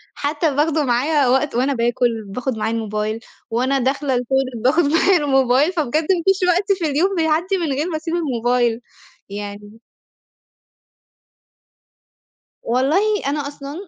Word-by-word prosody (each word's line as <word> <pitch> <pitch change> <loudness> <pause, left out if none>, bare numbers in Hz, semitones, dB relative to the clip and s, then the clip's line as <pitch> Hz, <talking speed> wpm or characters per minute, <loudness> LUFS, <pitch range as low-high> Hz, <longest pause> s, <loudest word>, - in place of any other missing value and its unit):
حتى 295 0 -1
باخده 305 +1 +1
معايا 275 +3 +1
وقت 265 +1 +1
وأنا 265 +3 +1
باكل 235 -1 0
باخد 245 +4 -4
معايا 220 +1 -1
الموبايل، 215 0 -3 0.3
وأنا 255 +4 0
داخلة 270 +1 0
الToilet 255 -1 -1
باخد 300 +7 +3
معايا 330 +6 +3
الموبايل 270 0 +2
فبجد 305 -6 -2
ما 345 +1 0
فيش 385 0 +3
وقت 365 +3 +1
في 335 - -1
اليوم 320 +7 +1
بيعدّي 335 +3 +1
من 335 -5 -2
غير 300 +6 -2
ما 315 - -2
أسيب 325 +1 -5
الموبايل 245 -6 0 0.5
يعني 205 +2 -8 2.8
والله 260 +7 +1 0.3
أنا 285 0 -2
أصلًا 285 0 -8
275 Hz, 135 wpm, -20 LUFS, 240-315 Hz, 2.8 s, باخد